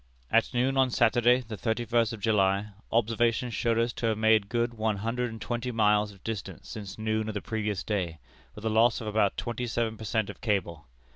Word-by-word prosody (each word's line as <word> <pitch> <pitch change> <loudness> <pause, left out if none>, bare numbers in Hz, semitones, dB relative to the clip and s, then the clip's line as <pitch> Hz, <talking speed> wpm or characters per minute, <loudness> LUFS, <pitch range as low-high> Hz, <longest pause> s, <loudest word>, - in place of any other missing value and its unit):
"At 115 +1 +3
noon 130 +2 +1
on 130 -1 +4
Saturday, 120 +1 +4
the 110 -3 -7
thirty 110 +5 -1
first 115 -1 +2
of 115 -3 -7
July, 100 -1 +2 0.2
observations 115 +1 +1
showed 115 0 +1
us 115 +1 +1
to 115 - -2
have 110 -1 +1
made 110 -2 +3
good 120 0 0
one 110 -2 -1
hundred 120 +4 -2
and 110 0 -8
twenty 120 +2 -3
miles 105 -2 +2
of 95 -2 -18
distance 110 -4 -6
since 100 -3 -7
noon 110 0 -1
of 110 - -4
the - - 0
previous 105 0 -3
day, 90 -6 -2 0.4
with 105 - -9
a - - +2
loss 115 +1 +4
of 115 - -7
about 105 -2 +1
twenty 120 +1 -3
seven 115 -1 -1
per 110 - -9
cent 110 0 0
of - - -17
cable. 85 - -1
110 Hz, 215 wpm, -28 LUFS, 105-120 Hz, 0.4 s, on